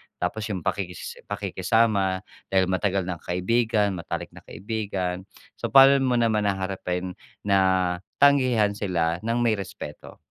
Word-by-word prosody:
tapos 105 Hz, +5 st, -3 dB
'yung 95 Hz, -6 st, -4 dB
pakikis 95 Hz, -1 st, -4 dB
pakikisama 100 Hz, -5 st, 0 dB, 0.2 s
dahil 95 Hz, -1 st, +2 dB
matagal 95 Hz, +1 st, 0 dB
ng 90 Hz, -2 st, -5 dB
kaibigan, 105 Hz, +3 st, +1 dB
matalik -, -, -5 dB
na -, -, -13 dB
kaibigan. 95 Hz, -4 st, -4 dB, 0.3 s
So -, -, -2 dB
paano 135 Hz, 0 st, +7 dB
mo 130 Hz, -2 st, +1 dB
naman 110 Hz, -3 st, +2 dB
haharapin 95 Hz, -2 st, -3 dB, 0.3 s
na, 95 Hz, -3 st, +2 dB, 0.2 s
tanggihan 130 Hz, -6 st, +4 dB
sila 85 Hz, -5 st, -1 dB
ng 115 Hz, +2 st, -1 dB
may 115 Hz, -2 st, +3 dB
respeto? 95 Hz, -6 st, -9 dB
100 Hz, 130 wpm, -25 LUFS, 90-110 Hz, 0.3 s, paano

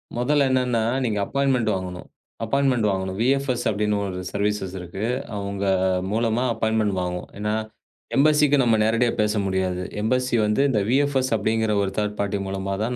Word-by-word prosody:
முதல்ல 140 Hz, +4 st, +2 dB
என்னன்னா, 125 Hz, -3 st, +1 dB, 0.2 s
நீங்க 105 Hz, -3 st, -1 dB
அப்பாயின்ட்மெண்ட் 135 Hz, -4 st, +1 dB
வாங்கணும். 90 Hz, -1 st, -6 dB, 0.4 s
அப்பாயின்ட்மெண்ட் 130 Hz, -1 st, +1 dB
வாங்கணும். 95 Hz, 0 st, -3 dB
வி.எஃப்.எஸ் 130 Hz, -1 st, +1 dB
அப்படின்னு 105 Hz, 0 st, 0 dB
ஒரு 90 Hz, -1 st, -4 dB
சர்வீசஸ் 100 Hz, -2 st, -1 dB
இருக்கு. 95 Hz, +4 st, -5 dB, 0.3 s
அவங்க 100 Hz, 0 st, -4 dB, 0.5 s
மூலமா 115 Hz, +2 st, +1 dB
அப்பாயின்ட்மெண்ட் 110 Hz, -2 st, 0 dB
வாங்கும். 90 Hz, 0 st, -4 dB
ஏன்னா 105 Hz, +1 st, -1 dB, 0.6 s
எம்பஸிக்கு 150 Hz, 0 st, +4 dB
நாம 115 Hz, -3 st, +3 dB
நேரடியா 115 Hz, +2 st, +2 dB
பேச 105 Hz, 0 st, +1 dB
முடியாது. 95 Hz, -1 st, -1 dB, 0.2 s
எம்பஸி 125 Hz, +2 st, +1 dB
வந்து 105 Hz, +5 st, +1 dB
இந்த 105 Hz, -5 st, +1 dB
வி.எஃப்.எஸ் 135 Hz, -1 st, +1 dB
அப்படிங்கற 110 Hz, +1 st, 0 dB
ஒரு 95 Hz, -, -2 dB
தர்ட் 105 Hz, -1 st, -1 dB
பார்ட்டி 100 Hz, 0 st, 0 dB
மூலமா 95 Hz, 0 st, -3 dB
தான் 125 Hz, +2 st, -2 dB
110 Hz, 150 wpm, -23 LUFS, 100-125 Hz, 0.6 s, எம்பஸிக்கு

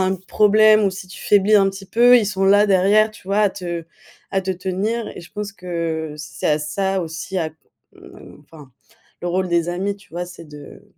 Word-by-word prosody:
un 190 Hz, 0 st, +1 dB
problème 215 Hz, +3 st, +4 dB
ou 195 Hz, -, +2 dB
si 190 Hz, 0 st, -9 dB
tu 180 Hz, -1 st, -12 dB
faiblis 205 Hz, +1 st, +3 dB
un 195 Hz, -2 st, +5 dB
petit 195 Hz, 0 st, -10 dB
peu, 245 Hz, +4 st, +5 dB
ils 220 Hz, -, 0 dB
sont 195 Hz, -1 st, -1 dB
là 205 Hz, +2 st, +5 dB
derrière, 205 Hz, +3 st, +3 dB
tu 195 Hz, -, -15 dB
vois, 200 Hz, +1 st, +1 dB
à 210 Hz, -1 st, +4 dB
te 175 Hz, -3 st, -6 dB, 0.5 s
à 195 Hz, -, +1 dB
te 190 Hz, 0 st, -3 dB
tenir 190 Hz, +5 st, -2 dB
et -, -, -7 dB
je 170 Hz, -, -14 dB
pense 205 Hz, -1 st, -6 dB
que 165 Hz, -4 st, -4 dB
c'est 150 Hz, -, -5 dB
à 150 Hz, -1 st, +2 dB
ça 190 Hz, +6 st, -2 dB
aussi 170 Hz, +3 st, -5 dB
à 160 Hz, -2 st, -2 dB
c -, -, -25 dB, 0.9 s
enfin 145 Hz, -3 st, -16 dB, 0.5 s
le 175 Hz, -, -3 dB
rôle 185 Hz, +1 st, -1 dB
des 170 Hz, -1 st, 0 dB
amis 190 Hz, +3 st, -2 dB
tu 200 Hz, -, -21 dB
vois 175 Hz, +1 st, -3 dB
c'est 175 Hz, -2 st, -12 dB
de 150 Hz, +5 st, -13 dB
190 Hz, 215 wpm, -20 LUFS, 170-205 Hz, 0.9 s, un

